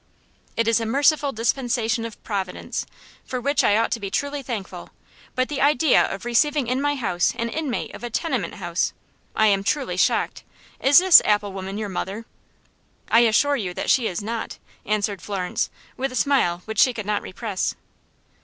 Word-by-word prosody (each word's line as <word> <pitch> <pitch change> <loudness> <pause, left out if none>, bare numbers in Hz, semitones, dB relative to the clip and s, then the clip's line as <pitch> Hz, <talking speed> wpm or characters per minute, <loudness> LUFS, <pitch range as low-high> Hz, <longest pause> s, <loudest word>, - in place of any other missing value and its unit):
"It 230 0 +1
is 230 0 +3
a 225 - -2
merciful 285 +3 +2
dispensation 235 -1 0
of 230 - -9
Providence, 195 -4 -4 0.4
for 255 - -4
which 280 +4 +1
I 205 - +4
ought 230 - +1
to 235 - -1
be 200 -2 -4
truly 285 +7 -2
thankful. 225 -7 -6 0.5
But 255 0 +1
the 290 -2 -3
idea 290 0 +4
of 195 - -6
receiving 285 +4 +2
in 255 +3 -1
my 290 0 +1
house 180 -9 0
an 235 0 -2
inmate 285 -1 -3
of - - -10
a 240 - -3
tenement 265 +2 -2
house! 175 -3 -2 0.4
I 220 - +3
am 200 -2 +3
truly 275 +6 -1
shocked. - - +1 0.4
Is 275 +1 +5
this 370 -1 +9
apple 205 -1 +1
woman 195 +1 -5
your 215 -1 -3
mother?" 195 +3 -5 0.9
"I 230 - +7
assure 240 +5 +3
you 180 -7 -4
that - - 0
she 245 -4 +3
is 185 +3 -4
not," 225 +1 -4 0.3
answered 205 -3 -1
Florence, 190 -3 -2 0.3
with 270 +1 -2
a - - -7
smile 230 -11 +1
which 220 -1 -4
she 255 - +5
could 215 - -5
not 210 0 0
repress. 200 0 -3
230 Hz, 180 wpm, -23 LUFS, 205-270 Hz, 0.9 s, this